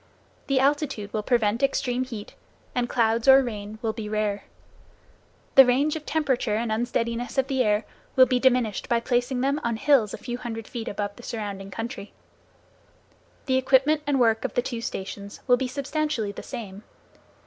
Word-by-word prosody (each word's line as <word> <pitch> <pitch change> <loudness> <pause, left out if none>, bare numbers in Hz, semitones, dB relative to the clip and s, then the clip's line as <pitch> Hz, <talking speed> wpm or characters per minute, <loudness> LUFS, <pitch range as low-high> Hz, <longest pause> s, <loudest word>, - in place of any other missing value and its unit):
The 275 -1 +2
altitude 275 -7 0
will 215 - 0
prevent 230 0 +1
extreme 255 -2 +1
heat, 225 -5 -8 0.4
and 245 -1 -1
clouds 230 0 +1
or 270 0 +8
rain 215 -3 -6
will 220 -1 0
be 215 -2 -6
rare. 210 -1 -1 1.1
The 270 - +10
range 270 +5 +2
of 310 -1 -7
temperature 260 -8 0
and 225 +1 -1
unsteadiness 235 +2 -2
of 265 - +3
the 265 -1 0
air 210 -1 +1 0.3
will 260 - +8
be 250 0 +1
diminished 245 -5 +1
by 235 - +3
placing 245 +1 0
them 280 +3 0
on 235 -1 0
hills 230 -4 +3
a - - -5
few 245 -1 -5
hundred 225 -3 -6
feet 235 -3 -6
above 205 0 -3
the - - -11
surrounding 200 -4 -5
country. 225 +2 -6 1.3
The 260 -2 +2
equipment 270 +4 +3
and 280 -2 +2
work 225 -2 +3
of - - -3
the 245 - +2
two 240 -3 -4
stations 200 -1 -6
will 250 - +5
be 260 - -2
substantially 280 -4 -2
the - - -8
same. 200 -3 -7
240 Hz, 175 wpm, -25 LUFS, 215-265 Hz, 1.3 s, The